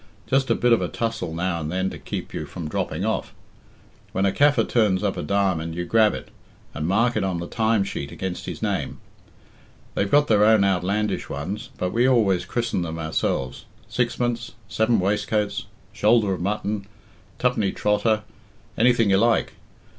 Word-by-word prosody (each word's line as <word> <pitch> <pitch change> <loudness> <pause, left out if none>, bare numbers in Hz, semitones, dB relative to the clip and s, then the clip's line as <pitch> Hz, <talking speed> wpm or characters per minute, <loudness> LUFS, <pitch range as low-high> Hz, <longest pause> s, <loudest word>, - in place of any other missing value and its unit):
Just 135 0 +1
a - - +4
bit 120 -1 +3
of 115 - +3
a - - 0
tussle 115 -7 -3
now 85 +1 -1
and 75 0 -4
then 95 +1 -1
to - - -8
keep - - -6
you - - -4
from 85 -4 -6
dropping - - -2
off. - - -2 0.8
When 95 - +1
a 100 - +3
Kaffir 145 +5 +3
turns 105 -5 +2
up 100 -2 0
a - - -3
diamond, 85 -2 0
you 85 0 -3
grab 110 +2 +4
it, - - -8 0.4
and 75 +2 -3
mark 115 +6 +2
it 110 - +1
on 95 -2 -1
the 85 - -4
time 110 +1 +1
sheet 70 -7 -5
against 95 -1 -5
his - - -6
name. - - -2 1.0
They've 100 - 0
got 145 +4 +5
their 105 -5 +4
own 110 -1 +5
outlandish 100 +2 0
ones, 90 +10 -5
but 90 - -1
we 120 +3 +3
always 100 -8 +3
christen 120 -6 -1
them 80 -1 -4
ourselves 80 -5 -2 0.2
Sixpence, 120 -1 -1
Seven 110 +3 +2
Waistcoats, 105 +2 0 0.3
Shoulder 105 -2 +3
of 90 - -4
Mutton, 100 +1 -2 0.5
Twopenny 120 -6 +1
Trotter 105 +1 +1 0.6
anything 115 -3 +4
you 95 - +5
like. 115 +2 +2
100 Hz, 175 wpm, -24 LUFS, 90-115 Hz, 1.0 s, got